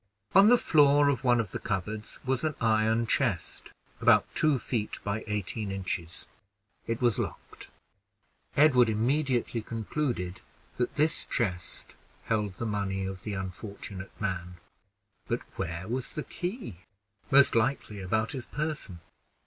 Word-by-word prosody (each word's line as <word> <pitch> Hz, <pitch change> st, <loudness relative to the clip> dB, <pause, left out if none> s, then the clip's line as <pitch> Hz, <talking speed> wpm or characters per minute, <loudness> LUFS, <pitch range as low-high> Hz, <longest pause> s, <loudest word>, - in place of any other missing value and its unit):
On 195 Hz, +2 st, +8 dB
the 245 Hz, -, +7 dB
floor 145 Hz, -6 st, +5 dB
of 135 Hz, -5 st, 0 dB
one 120 Hz, -2 st, +4 dB
of 105 Hz, -5 st, -2 dB
the -, -, -4 dB
cupboards 105 Hz, +3 st, -3 dB
was 130 Hz, +1 st, 0 dB
an 155 Hz, -2 st, 0 dB
iron 110 Hz, +1 st, +2 dB
chest 115 Hz, -, 0 dB, 0.3 s
about -, -, +6 dB
two 155 Hz, -3 st, +3 dB
feet 115 Hz, -3 st, -2 dB
by 105 Hz, +2 st, -2 dB
eighteen 105 Hz, 0 st, -2 dB
inches. 90 Hz, -3 st, -3 dB, 0.6 s
It 115 Hz, +1 st, -2 dB
was 120 Hz, -3 st, +2 dB
locked. -, -, -6 dB, 0.9 s
Edward 130 Hz, -6 st, +6 dB
immediately 120 Hz, +1 st, +1 dB
concluded 110 Hz, -4 st, -3 dB, 0.4 s
that 125 Hz, -, -1 dB
this 155 Hz, +2 st, +1 dB
chest 90 Hz, -9 st, -3 dB, 0.3 s
held 105 Hz, -4 st, -1 dB
the 115 Hz, -, -4 dB
money 100 Hz, -3 st, -1 dB
of 95 Hz, -1 st, -5 dB
the 105 Hz, -2 st, -4 dB
unfortunate 95 Hz, +1 st, -7 dB
man; 90 Hz, -3 st, -3 dB, 0.7 s
but -, -, -1 dB
where 85 Hz, +2 st, -4 dB
was 125 Hz, +2 st, -3 dB
the 150 Hz, -, -2 dB
key? 180 Hz, -, -5 dB, 0.5 s
Most 140 Hz, -1 st, +6 dB
likely 115 Hz, -3 st, 0 dB
about 110 Hz, +4 st, 0 dB
his 130 Hz, -4 st, -4 dB
person. 150 Hz, -, -3 dB
110 Hz, 135 wpm, -29 LUFS, 95-135 Hz, 0.9 s, On